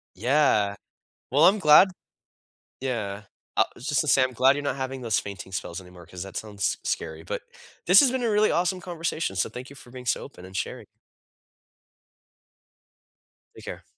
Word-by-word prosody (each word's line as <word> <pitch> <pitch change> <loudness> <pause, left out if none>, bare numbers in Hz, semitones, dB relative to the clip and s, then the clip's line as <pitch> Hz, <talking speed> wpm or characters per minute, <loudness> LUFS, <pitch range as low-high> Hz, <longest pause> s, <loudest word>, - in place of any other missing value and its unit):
Yeah. 110 -3 +2 0.6
Well, 145 +5 +4
I'm 200 +4 +6
glad 155 +2 +7 0.9
Yeah. 105 -6 -3 0.3
I - - +4
just 140 +4 0
to 150 - -4
say, 135 - +5
I'm 130 0 -1
glad 130 +3 +4
you're 145 - -3
not 140 - -1
having 130 -1 -4
those 115 -6 0
fainting 95 0 -8
spells 90 -1 -5
anymore 90 -1 -14
'cause 90 +1 -9
that 95 +1 -6
sounds 105 -2 -2
scary, 80 -1 -3
but - - -4 0.5
this 185 +3 +8
has 265 - +4
been 260 -1 -1
a 235 - +1
really 210 0 +3
awesome 180 +2 0
conversation, 170 - -3
so 95 - 0
thank 125 +2 -9
you - - -12
for 130 - -15
being 125 0 -10
so 120 - 0
open 90 - -11
and 95 +1 -12
sharing. - - -4 2.7
Take - - -12
care. - - -7
130 Hz, 175 wpm, -26 LUFS, 100-150 Hz, 2.7 s, this